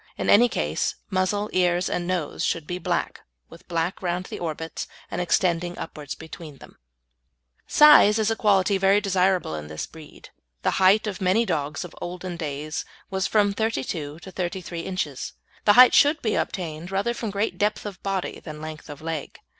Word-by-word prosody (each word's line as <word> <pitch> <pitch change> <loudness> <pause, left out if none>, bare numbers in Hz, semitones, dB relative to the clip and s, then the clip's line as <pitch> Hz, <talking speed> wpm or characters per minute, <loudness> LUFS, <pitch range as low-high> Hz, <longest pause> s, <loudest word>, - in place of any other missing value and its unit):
In - - +1
any 240 +4 +6
case, 75 - -1 0.2
muzzle, 190 +2 0
ears, 180 0 +2
and 175 0 -2
nose 180 -5 -2
should 165 -3 -1
be 180 +3 -4
black, - - -2 0.3
with - - -15
black 170 +1 -2
round 180 0 -2
the - - -7
orbits, 160 -1 -4 0.2
and 175 - -2
extending 175 0 +1
upwards 150 -3 -6
between 160 -2 -10
them. - - -16 0.9
Size 295 -8 +7
is 220 0 +1
a - - +1
quality 200 -2 +3
very 195 +1 +4
desirable 190 - +1
in 75 -1 -5
this 75 0 -5
breed. 160 -2 -14 0.3
The - - +2
height 195 +4 +5
of 200 -3 -4
many 190 +5 +3
dogs 150 -3 -2
of 175 - -11
olden 180 0 -5
days 155 -1 -4 0.3
was 190 0 0
from 205 -2 +2
thirty 220 -9 -1
two 150 -1 -5
to 190 - -10
thirty 185 0 -3
three 170 -1 -6
inches. 165 -7 -4 0.3
The 205 - +7
height 250 +2 +8
should 295 +2 +5
be 220 - +1
obtained 170 -2 -3
rather 195 +5 0
from 230 -2 -4
great 200 +2 -2
depth 210 +1 0
of 200 -2 -7
body 195 -2 -3
than 155 -2 -9
length 155 0 -8
of 145 +1 -9
leg. 160 -3 -4
180 Hz, 185 wpm, -24 LUFS, 160-200 Hz, 0.9 s, height